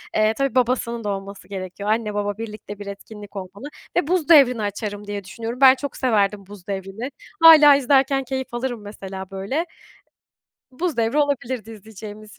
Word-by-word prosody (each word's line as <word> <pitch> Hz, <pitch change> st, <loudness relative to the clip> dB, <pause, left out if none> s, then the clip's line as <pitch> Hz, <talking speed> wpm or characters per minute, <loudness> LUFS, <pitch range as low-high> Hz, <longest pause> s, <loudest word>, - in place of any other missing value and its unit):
Eee, 215 Hz, 0 st, +3 dB
tabii 275 Hz, +1 st, -1 dB
babasının 235 Hz, -2 st, 0 dB
da 210 Hz, -, -2 dB
olması 195 Hz, 0 st, -6 dB
gerekiyor. 195 Hz, +1 st, -6 dB
Anne, 215 Hz, -1 st, 0 dB
baba 205 Hz, 0 st, -2 dB
birlikte 215 Hz, -2 st, -8 dB
bir 205 Hz, -, -7 dB
etkinlik 205 Hz, +1 st, -10 dB
olmalı 195 Hz, +7 st, -8 dB, 0.3 s
ve 350 Hz, -4 st, +1 dB
Buz 345 Hz, -2 st, 0 dB
Devri'ni 260 Hz, -8 st, +6 dB
açarım 205 Hz, 0 st, -4 dB
diye 205 Hz, -1 st, -4 dB
düşünüyorum. 230 Hz, +6 st, -7 dB
Ben 265 Hz, -1 st, +8 dB
çok 285 Hz, +1 st, -6 dB
severdim 210 Hz, -5 st, +1 dB
Buz 205 Hz, -1 st, -13 dB
Devri'ni. 195 Hz, +6 st, -5 dB, 0.3 s
Hâlâ 305 Hz, -3 st, +9 dB
izlerken 270 Hz, 0 st, +2 dB
keyif 265 Hz, -1 st, -5 dB
alırım 240 Hz, -2 st, -3 dB
mesela, 195 Hz, -2 st, -8 dB
böyle. 200 Hz, -, -2 dB, 1.1 s
Buz 320 Hz, +2 st, -3 dB
Devri 230 Hz, +5 st, +1 dB
olabilirdi 260 Hz, -6 st, -1 dB
izleyeceğimiz 215 Hz, 0 st, -11 dB
220 Hz, 160 wpm, -22 LUFS, 205-265 Hz, 1.1 s, Hâlâ